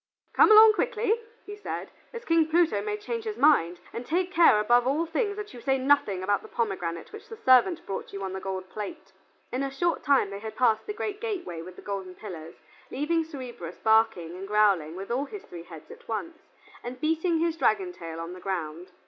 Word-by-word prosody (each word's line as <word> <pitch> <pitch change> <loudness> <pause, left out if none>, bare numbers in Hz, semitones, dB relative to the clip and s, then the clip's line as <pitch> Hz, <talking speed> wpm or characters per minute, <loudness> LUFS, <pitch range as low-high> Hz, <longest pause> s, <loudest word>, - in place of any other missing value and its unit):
"Come - - +6
along 435 0 +9
quickly," 460 0 0 0.2
he 410 - -7
said, 415 - -6 0.2
"as 470 +1 -8
King 330 -1 +3
Pluto 330 +1 +2
may 420 0 -3
change 455 +2 -5
his 430 -1 -4
mind, 180 - +4
and 235 - -5
take 360 +7 -1
care 335 - +6
above 240 +3 +3
all 300 +5 +1
things 405 +6 -1
that 420 -6 -7
you 240 - -10
say 270 +1 +1
nothing 265 -8 +2
about 200 +1 +1
the - - -12
pomegranate 180 - -3
which 430 +1 -11
the 450 - -8
servant 325 - +4
brought 195 - -5
you 195 0 -6
on 190 -1 -4
the 190 - -4
gold 190 -1 -5
plate." 195 -1 -8 0.4
In 255 - -1
a 275 - -1
short 340 +6 -1
time 275 -8 +3
they 200 - -6
had 220 +1 -7
passed 225 -3 +2
the - - -2
great 420 -1 -4
gateway 365 - -4
with 180 +2 -10
the - - -13
golden 195 -2 -5
pillars, 170 -6 -9 0.3
leaving 325 +5 0
Cerberus 250 - -8
barking 220 -6 +2
and 190 +2 -7
growling 200 -7 +2
with 195 +4 -7
all 265 +4 0
his 405 +7 -9
three 170 -1 -10
heads 160 -4 -12
at - - -14
once, 320 +9 -5 0.4
and 245 +1 -7
beating 325 +3 +1
his 330 0 0
dragon 370 +2 +1
tail 165 - -8
on 165 +1 -6
the 185 - -10
ground. 180 -1 -5
250 Hz, 215 wpm, -27 LUFS, -, 0.4 s, along